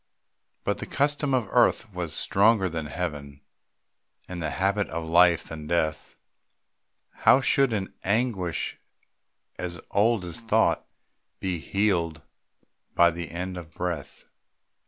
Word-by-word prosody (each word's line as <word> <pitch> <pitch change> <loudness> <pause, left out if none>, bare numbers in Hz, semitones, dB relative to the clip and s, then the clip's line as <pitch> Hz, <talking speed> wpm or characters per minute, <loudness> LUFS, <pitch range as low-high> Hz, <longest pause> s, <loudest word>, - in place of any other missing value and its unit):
But - - -1
the - - -6
custom 145 0 0
of 120 -5 0
earth 120 -3 +3
was 85 -3 -4
stronger 100 +4 +3
than 80 -3 -4
Heaven, 75 -4 -5 0.9
And 90 -1 -6
the 80 - -1
habit 100 +3 0
of 80 0 -4
life 85 0 +5
than 75 -1 -8
death, 80 -2 -1 1.0
How - - +5
should 135 -1 +3
an 100 -3 -2
anguish 100 -5 -1 0.8
as 85 -1 -4
old 105 -1 +2
as 85 -2 -5
thought 110 -1 +2 0.5
Be 90 -3 -2
healed 85 -5 0 0.7
by 85 0 +6
the 85 -2 -6
end 90 +3 -5
of 85 -2 -10
breath? 85 -5 -4
90 Hz, 125 wpm, -26 LUFS, 85-105 Hz, 1.0 s, by